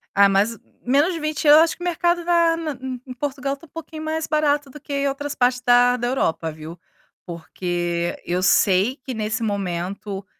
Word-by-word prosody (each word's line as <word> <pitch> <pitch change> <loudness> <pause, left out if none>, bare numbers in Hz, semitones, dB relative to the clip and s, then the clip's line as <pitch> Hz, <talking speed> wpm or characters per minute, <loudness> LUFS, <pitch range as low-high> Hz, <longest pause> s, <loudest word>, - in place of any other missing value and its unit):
Ah, 200 0 +7
mas, 200 +4 +1 0.3
menos 285 +8 +2
de 330 - -4
€20 305 0 +4
eu - - +7
acho 330 - -1
que 350 - -9
o - - -4
mercado 345 0 0
va 335 -1 +3
na 320 -2 -3
em 260 -2 -5
em 255 - -8
Portugal 275 +1 -3
está 280 +3 -11
um - - -38
pouquinho 315 0 -8
mais 315 0 -2
barato 295 -2 +1
do 300 - -11
que 280 -1 -2
outras 285 +1 -4
partes 250 0 +1
da 245 0 +4
da 240 - -2
Europa, 165 -10 -1
viu, 155 +2 -10 0.5
porque 175 0 -3
eu 180 +1 -1
sei 190 +5 +3
que 260 - -5
nesse 220 0 -2
momento 195 0 -3
255 Hz, 195 wpm, -22 LUFS, 195-300 Hz, 0.5 s, Ah